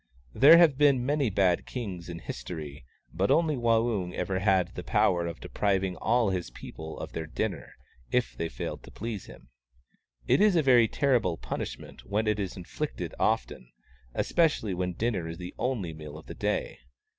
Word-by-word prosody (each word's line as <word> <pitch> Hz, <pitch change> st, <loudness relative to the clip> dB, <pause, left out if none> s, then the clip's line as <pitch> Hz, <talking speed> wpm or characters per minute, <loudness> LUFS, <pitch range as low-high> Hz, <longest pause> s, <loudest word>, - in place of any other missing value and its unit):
There 150 Hz, +5 st, +8 dB
have 160 Hz, -6 st, +5 dB
been 140 Hz, -4 st, +4 dB
many 145 Hz, -2 st, +1 dB
bad 95 Hz, -3 st, +2 dB
kings 95 Hz, -9 st, -5 dB
in 85 Hz, -, -5 dB
history, 75 Hz, -5 st, -7 dB, 0.3 s
but 95 Hz, +5 st, 0 dB
only 160 Hz, -2 st, +3 dB
Waung 115 Hz, -6 st, +1 dB
ever 95 Hz, +1 st, -1 dB
had 95 Hz, -2 st, +2 dB
the -, -, -6 dB
power 85 Hz, -1 st, +2 dB
of 85 Hz, -, -6 dB
depriving 95 Hz, -2 st, 0 dB
all 115 Hz, -3 st, +2 dB
his 90 Hz, -7 st, -3 dB
people 80 Hz, +6 st, -9 dB
of -, -, -6 dB
their 80 Hz, -1 st, -5 dB
dinner, 80 Hz, -, -4 dB, 0.4 s
if 125 Hz, 0 st, 0 dB
they 85 Hz, -, -3 dB
failed -, -, -5 dB
to -, -, -13 dB
please 110 Hz, -2 st, -5 dB
him. 60 Hz, -, -14 dB, 0.8 s
It -, -, +3 dB
is 210 Hz, -3 st, +5 dB
a 165 Hz, -, +4 dB
very 125 Hz, -4 st, +6 dB
terrible 120 Hz, -, +1 dB
punishment -, -, -6 dB
when 105 Hz, +2 st, -1 dB
it 105 Hz, -1 st, +1 dB
is 95 Hz, -2 st, -4 dB
inflicted 90 Hz, -, -5 dB
often, -, -, -1 dB, 0.4 s
especially 150 Hz, -, +1 dB
when 90 Hz, 0 st, -2 dB
dinner 105 Hz, -4 st, -1 dB
is 80 Hz, 0 st, -6 dB
the 90 Hz, 0 st, -7 dB
only 110 Hz, -10 st, -1 dB
meal 75 Hz, -1 st, -9 dB
of 80 Hz, -, -12 dB
the -, -, -8 dB
day. -, -, -2 dB
100 Hz, 175 wpm, -28 LUFS, 85-125 Hz, 0.8 s, There